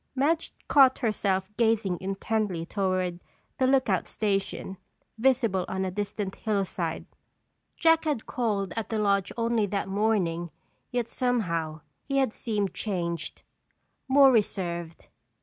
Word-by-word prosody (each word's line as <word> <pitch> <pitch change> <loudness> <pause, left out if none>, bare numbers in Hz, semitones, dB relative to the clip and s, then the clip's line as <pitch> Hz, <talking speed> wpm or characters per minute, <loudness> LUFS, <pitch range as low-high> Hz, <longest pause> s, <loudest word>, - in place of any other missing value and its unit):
Madge 310 +5 +1 0.2
caught 265 -2 +6
herself 200 -4 0
gazing 220 -6 +2
intently 195 -2 -1
toward 185 -2 -1 0.4
the 260 - +3
lookout 260 -9 +2
station 195 -2 -2 0.4
visible 230 -7 +2
on 190 0 -2
a 185 - -2
distant 205 0 -3
hillside. 195 -6 -2 0.7
Jack 325 -1 +4
had 295 -8 -1
called 205 -6 -1
at 225 -1 -3
the 225 - -1
lodge 200 -2 +1
only 230 -2 +1
that 200 -1 -2
morning 190 -5 0 0.4
yet 245 -2 -1
somehow 170 -13 -1 0.2
he 275 -1 -2
had 265 -5 +2
seemed 205 -4 -2
changed, 170 -5 -3 0.6
more 270 0 +7
reserved. 175 -7 -1
205 Hz, 120 wpm, -27 LUFS, 185-235 Hz, 0.7 s, more